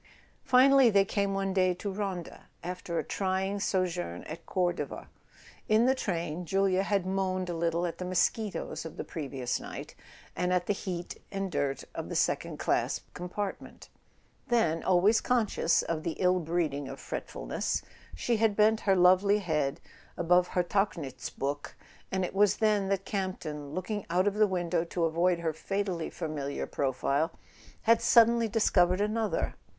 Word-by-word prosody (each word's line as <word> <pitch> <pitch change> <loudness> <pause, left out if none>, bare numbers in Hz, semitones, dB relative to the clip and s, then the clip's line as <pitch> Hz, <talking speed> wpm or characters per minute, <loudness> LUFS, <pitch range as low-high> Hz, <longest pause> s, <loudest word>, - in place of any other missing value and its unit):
Finally 265 -1 +6
they 200 -2 +4
came 200 0 0
one 195 -1 -1
day 185 -1 +2
to 200 +3 -4
Ronda, 190 -3 -5 0.2
after 180 -1 -4
a - - 0
trying 190 +1 -1
sojourn 180 - -1
at 165 +2 -9
Cordova. 175 -2 -2 0.6
In 215 +2 +5
the 260 - +4
train 175 - -3
Julia 190 +1 +2
had 195 -2 0
moaned 185 -1 -1
a - - -3
lit¬ 170 0 +1
tle 170 +1 0
at 170 -1 -4
the 180 - -3
mosquitoes 185 +3 -1
of 160 - -9
the - - -3
previous 135 -5 -3
night, - - -8 0.4
and 180 0 0
at 180 -1 +1
the 205 - +1
heat 180 -3 -5
and 195 -1 -3
dirt 140 -4 -1
of - - -5
the - - -4
second - - 0
class - - 0
compartment; 185 +3 -6 0.6
then, 195 -10 +2
always 190 +4 +4
conscious 235 -8 +2
of 165 -2 -2
the 165 +1 -2
ill 180 +1 +2
breeding 160 -4 -1
of - - -8
fretfulness, - - -3 0.3
she 230 - 0
had 220 -2 +2
bent 215 +1 +4
her 195 - +6
lovely 185 +3 +5
head 150 -8 -1 0.4
above 180 +1 +3
her 180 - 0
Tauchnitz. 165 -10 -2 0.8
And 190 -1 0
it - - -6
was 205 0 +3
then 210 -3 +2
that 195 -1 -1
Campton, 155 -7 -4
looking 205 +2 -3
out 180 +3 +2
of 205 - +2
the 215 0 +4
window 175 -3 0
to 170 0 -1
avoid 170 +2 +1
her 160 -2 -1
fatally 185 0 -2
familiar 150 -4 -4
profile, 140 +4 0 0.5
had 230 0 +4
suddenly 235 -1 +5
dis¬ 225 0 +1
covered 180 0 +4
another. 215 +1 0
185 Hz, 160 wpm, -29 LUFS, 170-205 Hz, 0.8 s, Finally